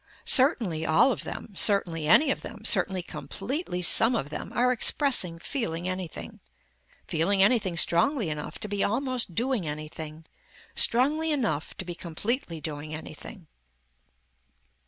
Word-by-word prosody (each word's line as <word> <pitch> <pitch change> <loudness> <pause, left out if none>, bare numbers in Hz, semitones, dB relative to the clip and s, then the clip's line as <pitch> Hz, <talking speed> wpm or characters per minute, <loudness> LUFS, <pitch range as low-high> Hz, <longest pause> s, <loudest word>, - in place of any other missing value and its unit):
Certainly 230 - +4
all 160 +12 +3
of - - -5
them, 210 - -8
certainly 170 -8 +3
any 275 - +5
of - - -3
them, - - -10
certainly 185 -2 +3
completely 180 - -5
some 225 +7 +5
of 145 -8 -3
them - - -7
are 250 +1 +1
expressing 245 - +2
feeling 175 - -4
anything, 180 - -6 0.7
feeling 190 +5 +1
anything 200 -6 +1
strongly 210 - +2
enough 150 0 -6
to 210 - -3
be 205 -1 -2
almost 245 -4 -1
doing 240 -6 -1
anything, 155 +1 -7 0.5
strongly 300 +7 +2
enough 225 - -2
to 190 - -6
be 175 - -6
completely 175 - -4
doing 150 0 -6
anything. 160 +4 -10
185 Hz, 135 wpm, -26 LUFS, 160-250 Hz, 0.7 s, any